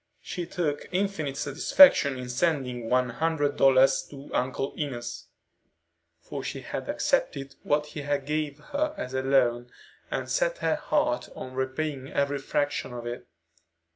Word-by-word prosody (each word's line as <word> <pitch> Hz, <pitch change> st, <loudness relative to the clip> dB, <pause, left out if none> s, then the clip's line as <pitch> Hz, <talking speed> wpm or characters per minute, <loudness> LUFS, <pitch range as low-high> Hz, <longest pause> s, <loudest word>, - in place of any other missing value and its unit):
She 175 Hz, -2 st, -4 dB
took 150 Hz, -5 st, -2 dB
infinite 180 Hz, -7 st, -1 dB
satisfaction 140 Hz, -, +6 dB
in 125 Hz, -1 st, -6 dB
sending 125 Hz, -4 st, -1 dB
one 125 Hz, 0 st, +3 dB
hundred 145 Hz, +1 st, 0 dB
dollars 135 Hz, 0 st, +5 dB
to 140 Hz, 0 st, -11 dB
Uncle 130 Hz, +2 st, -1 dB
Enos, 120 Hz, -5 st, -5 dB, 0.9 s
for -, -, -7 dB
she -, -, -4 dB
had -, -, -5 dB
accepted 135 Hz, 0 st, 0 dB
what 150 Hz, 0 st, +1 dB
he 150 Hz, 0 st, -7 dB, 0.2 s
gave 150 Hz, -1 st, -2 dB, 0.2 s
her 305 Hz, +1 st, 0 dB
as 125 Hz, -, -5 dB
a 130 Hz, -, 0 dB
loan, 125 Hz, -3 st, +2 dB, 0.4 s
and -, -, -3 dB
set -, -, +1 dB
her -, -, +1 dB
heart 305 Hz, +1 st, 0 dB
on 130 Hz, -, -7 dB
repaying 130 Hz, +1 st, -2 dB
every 140 Hz, 0 st, 0 dB
fraction 145 Hz, -2 st, -1 dB
of 120 Hz, -1 st, -6 dB
it. 120 Hz, +1 st, -6 dB
140 Hz, 140 wpm, -27 LUFS, 130-155 Hz, 0.9 s, satisfaction